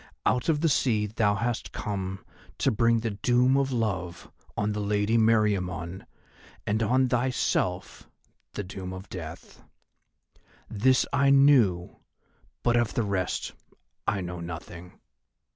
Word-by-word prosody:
"Out 125 +4 +1
of 150 -2 +2
the 165 - +3
sea 115 -8 +2
thou 105 -1 +1
hast 115 +3 -2
come 95 -2 -4 0.3
to 135 - +2
bring 115 +1 +2
the 115 -1 -2
doom 125 +5 +2
of 135 -1 +1
love 95 -8 -3 0.3
on 105 +1 0
the 105 - -3
Lady 105 +2 0
Meriamun 100 -6 +1 0.6
and 110 +2 0
on 130 +4 +3
thyself 125 +1 -1 0.4
the 105 - -4
doom 95 0 -7
of 95 +1 -9
death. 80 -3 -9 1.1
This 125 +5 +2
I 140 0 +3
knew, 130 -11 +4 0.7
but 120 - +3
of 120 -2 +1
the 115 - +1
rest 95 -3 -2 0.5
I 100 -2 0
know 90 -1 -5
nothing. 85 +1 -8
105 Hz, 130 wpm, -27 LUFS, 95-120 Hz, 1.1 s, knew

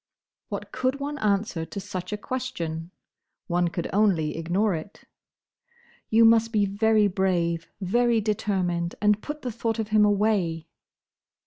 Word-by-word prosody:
What - - -5
could 260 +2 -1
one 290 +1 -4
answer 200 -5 0
to 165 +5 -6
such 185 -2 -6
a 210 - -2
question? 170 -10 -4 0.6
One 175 -1 +1
could 170 0 -3
only 190 -7 +2
ignore 180 +6 0
it. 165 +5 -7 1.1
"You 225 +1 +5
must 230 0 +5
be 210 -3 +2
very 215 +2 +3
brave; 175 -4 0
very 235 +5 +2
determined; 190 -5 -1
and 210 0 +3
put 300 0 -6
the 250 - -2
thought 230 0 -2
of 220 -2 -3
him 215 0 +4
away." 200 -6 +1
205 Hz, 140 wpm, -26 LUFS, 175-220 Hz, 1.1 s, You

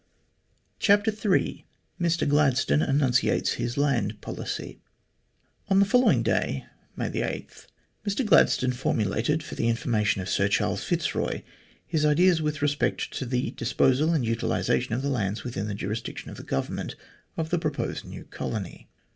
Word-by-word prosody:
CHAPTER 205 +1 +4
III 210 -2 0 0.4
MR 170 0 +1
GLADSTONE 135 - +3
ENUNCIATES 130 - +2
HIS 120 +1 -3
LAND 120 -7 +1
POLICY - - -6 0.9
ON 195 -1 +3
the 200 - +6
following 250 +6 +4
day, - - 0 0.3
May - - -2
8, - - -4 0.4
Mr 205 +6 0
Gladstone 130 -10 +4
formulated, 125 +4 0
for - - -8
the 115 - -1
information 110 -4 +1
of 90 - -4
Sir - - +2
Charles - - 0
Fitzroy, - - -1 0.4
his 155 -2 0
ideas 165 +3 +4
with 150 -1 -2
respect 145 0 0
to 130 - -4
the 125 +1 -1
disposal 135 +5 +2
and 150 -7 +1
utilisation 115 0 0
of 130 - -3
the 140 - 0
lands 105 -6 -1
within 105 -5 -4
the 105 - -3
jurisdiction 105 +3 -5
of - - -9
the - - -7
government 65 - -3 0.4
of 160 -1 -2
the 175 - +2
proposed 155 -3 -2
new - - -9
colony. 100 -6 -6
135 Hz, 145 wpm, -26 LUFS, 115-160 Hz, 0.9 s, the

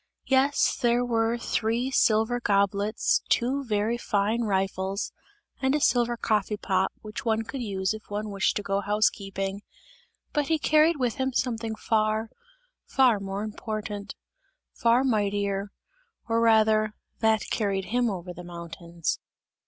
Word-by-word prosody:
Yes, 270 +2 +2
there 240 0 +3
were 230 -1 +1
three 235 +2 -1
silver 225 0 +3
goblets, 200 0 +1
two 265 +4 +1
very 220 0 0
fine 215 +1 0
rifles 195 -1 -1 0.5
and 265 +1 +2
a - - +2
silver 240 -3 +2
coffee 210 -2 0
pot, 190 -2 0
which 215 0 -6
one 225 -1 +1
could 260 +4 -6
use 195 -3 -1
if 220 0 -10
one 210 +1 -3
wished 195 0 +1
to 205 - -2
go 195 0 0
to - - -11
house 210 +1 +3
keeping; 195 0 -5 0.7
but 295 -2 +1
he 320 - +2
carried 310 +2 +4
with 250 -4 -1
him 265 0 -1
something 230 -3 -1
far, 215 0 0 0.6
far 250 -6 +4
more 195 +1 -4
important, 215 -1 -5 0.6
far 240 +1 +3
mightier, 205 -4 0 0.6
or 230 0 +1
rather 215 -1 +4 0.2
that 220 -1 +3
carried 195 -3 0
him 240 +4 +1
over 180 -2 -5
the 175 - -9
high 175 - -11
mountains. 170 0 -4
215 Hz, 145 wpm, -27 LUFS, 200-240 Hz, 0.7 s, carried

